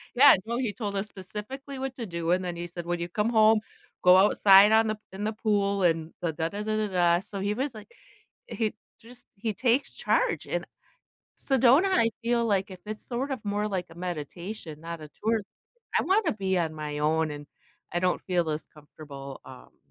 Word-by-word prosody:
Yeah, 275 Hz, +4 st, +8 dB
well, 235 Hz, +1 st, -2 dB
he 245 Hz, -5 st, -1 dB
told 200 Hz, -1 st, -4 dB
us 195 Hz, +1 st, -2 dB
specifically 215 Hz, +8 st, -8 dB
what 265 Hz, 0 st, -4 dB
to 235 Hz, -, -5 dB
do, 170 Hz, -3 st, -2 dB
and 185 Hz, +1 st, +2 dB
then 175 Hz, -1 st, -3 dB
he 170 Hz, 0 st, -5 dB
said, 175 Hz, 0 st, -7 dB
"When 175 Hz, 0 st, -2 dB
you 170 Hz, 0 st, -4 dB
come 210 Hz, +5 st, 0 dB
home, 220 Hz, -1 st, +5 dB, 0.4 s
go 180 Hz, 0 st, +8 dB
outside 195 Hz, +1 st, +7 dB
on 220 Hz, 0 st, +5 dB
the 215 Hz, 0 st, -1 dB
in 190 Hz, +2 st, -6 dB
the 215 Hz, +1 st, -1 dB
pool 200 Hz, -3 st, 0 dB
and 165 Hz, -2 st, +1 dB
the 165 Hz, -2 st, -1 dB
da 160 Hz, +1 st, -2 dB
da 205 Hz, +4 st, -5 dB
da 215 Hz, 0 st, -1 dB
da 215 Hz, 0 st, 0 dB
da," 175 Hz, -1 st, +4 dB
so 200 Hz, 0 st, -7 dB
he 200 Hz, +2 st, 0 dB
was, 265 Hz, +4 st, -2 dB
like, 215 Hz, -, -11 dB, 0.6 s
he 225 Hz, -, -2 dB, 0.3 s
just 245 Hz, +2 st, -15 dB
he 215 Hz, +2 st, -3 dB
takes 245 Hz, +5 st, +1 dB
charge, -, -, 0 dB
and -, -, -2 dB, 0.7 s
Sedona, 270 Hz, +7 st, +4 dB
I 230 Hz, -10 st, +3 dB
feel 235 Hz, 0 st, +1 dB
like 200 Hz, -2 st, +1 dB
if 185 Hz, -1 st, -10 dB
it's 215 Hz, 0 st, -7 dB
sort 255 Hz, +3 st, -3 dB
of 260 Hz, -5 st, -4 dB
more 205 Hz, +1 st, -1 dB
like 185 Hz, -3 st, -2 dB
a -, -, -13 dB
meditation, 175 Hz, 0 st, -6 dB
not 165 Hz, 0 st, -6 dB
a 155 Hz, -, -9 dB
tour 220 Hz, +1 st, +2 dB, 0.6 s
I -, -, 0 dB
wanna 385 Hz, -2 st, +2 dB
be 190 Hz, -3 st, -1 dB
on 165 Hz, -3 st, -1 dB
my 150 Hz, -1 st, -5 dB
own, 155 Hz, +1 st, +1 dB
and 145 Hz, 0 st, -8 dB, 0.5 s
I 175 Hz, -, +1 dB
don't 180 Hz, 0 st, +1 dB
feel 175 Hz, -3 st, 0 dB
as 155 Hz, 0 st, -3 dB
comfortable, 145 Hz, -2 st, -11 dB
um 130 Hz, -1 st, -14 dB
200 Hz, 210 wpm, -27 LUFS, 170-225 Hz, 0.7 s, Yeah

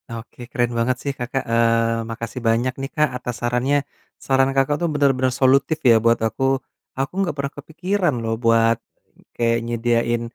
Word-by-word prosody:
Oke, 115 Hz, +2 st, -11 dB
keren 120 Hz, -3 st, 0 dB
banget 125 Hz, +2 st, +1 dB
sih 140 Hz, -, -1 dB
Kakak, 125 Hz, +2 st, -2 dB
eee, 115 Hz, 0 st, +2 dB
makasih 115 Hz, +2 st, -5 dB
banyak 120 Hz, +3 st, +2 dB
nih 135 Hz, -, -4 dB
Kak 150 Hz, -1 st, +3 dB
atas 125 Hz, -1 st, -5 dB
sarannya. 125 Hz, +4 st, +1 dB, 0.5 s
Saran 135 Hz, 0 st, +3 dB
Kakak 135 Hz, +2 st, +2 dB
tuh 170 Hz, -, +1 dB
bener-bener 135 Hz, -3 st, +2 dB
solutif 135 Hz, +4 st, +3 dB
ya 115 Hz, -, +7 dB
buat 115 Hz, 0 st, +4 dB
aku. 110 Hz, +4 st, -4 dB, 0.6 s
Aku 135 Hz, +4 st, -2 dB
nggak 175 Hz, -6 st, -1 dB
pernah 140 Hz, 0 st, -2 dB
kepikiran 170 Hz, +4 st, -1 dB
loh 115 Hz, 0 st, -1 dB
buat, 115 Hz, 0 st, +4 dB, 0.6 s
kayak 115 Hz, 0 st, +2 dB
nyediain 120 Hz, 0 st, 0 dB
125 Hz, 160 wpm, -21 LUFS, 115-140 Hz, 0.6 s, ya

